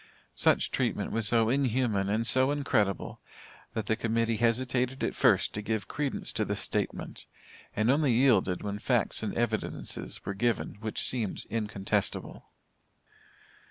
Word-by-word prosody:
Such - - +2
treatment - - -1
was 115 -1 0
so 115 0 +3
inhuman 120 -6 +1
and 110 +3 0
so 130 +2 +3
incredible, 125 - 0 0.5
that 110 -2 -2
the 110 - +1
Committee 115 0 0
hesitated 125 +2 0
at - - 0
first - - +3
to 105 - -3
give 110 -2 -2
credence 145 -2 -2
to - - 0
the - - -2
statement, - - -4 0.5
and 110 +4 +3
only 145 -1 +3
yielded 110 -8 +3
when 105 0 -3
facts 120 -1 +2
and 110 - -2
evidences 115 -2 -2
were 100 - -2
given 115 +1 -1
which 110 0 -2
seemed 115 -6 -1
incontestible. 105 -2 -2
115 Hz, 140 wpm, -29 LUFS, 105-125 Hz, 0.5 s, so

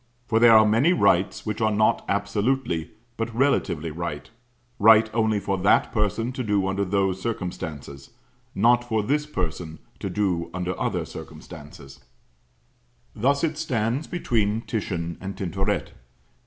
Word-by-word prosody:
For 115 -1 +1
there 115 -1 +8
are 110 - +6
many 115 +11 +3
rights 95 - +2
which 110 0 -3
are 110 - +3
not 110 0 +2
absolutely, 100 -2 -1 0.3
but 115 +1 -2
relatively 90 - +1
right 80 0 -6 0.5
right 110 +1 +7
only 110 -2 +1
for 100 -1 -2
that 95 +3 +3
person 115 +2 -1
to 130 0 -4
do 105 -3 +1
under 95 +1 -1
those 95 -1 0
circumstances, 80 -10 -5 0.5
not 120 +4 +4
for 110 -3 -1
this 150 +6 0
person 85 - -4 0.2
to - - -4
do 90 -5 -1
under 90 0 -2
other - - -1
circumstances. 70 -1 -11 1.2
Thus 140 +6 +1
it 160 -1 -1
stands 125 -1 -1
between 115 -10 0
Titian 95 -7 -4
and 95 +1 -6
Tintoret. 95 +1 -2
105 Hz, 140 wpm, -24 LUFS, 90-115 Hz, 1.2 s, there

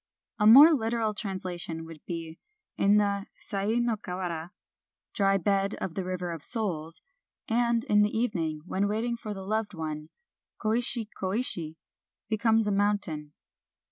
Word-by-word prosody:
A 210 - +4
more 285 +9 +10
literal 225 -4 0
translation 180 -5 -3
would 160 -2 -12
be: 165 -1 -6 0.4
"In 200 +1 +4
the 200 -1 0
Sai 200 +2 -2
no 240 -2 +1
Kawara 180 -4 -5 0.3
(' - - -65
Dry 195 -1 +3
bed 195 +2 0
of 180 - -5
the 190 - -3
River 180 -1 -3
of 165 -3 -7
Souls 170 -9 -1 0.3
') - - -65
and 235 0 +1
in 210 -6 +3
the 210 - +3
evening 165 -10 -1
when 195 +2 0
waiting 225 +3 -1
for 215 -3 -6
the 190 -1 -7
loved 215 0 -2
one, 155 -1 -5 0.2
' - - -63
Koishi, 230 0 +1
Koishi 185 -6 -1 0.3
' - - -64
becomes 225 0 +3
a 210 - 0
mountain." 195 -7 0
200 Hz, 160 wpm, -28 LUFS, 170-220 Hz, 0.4 s, more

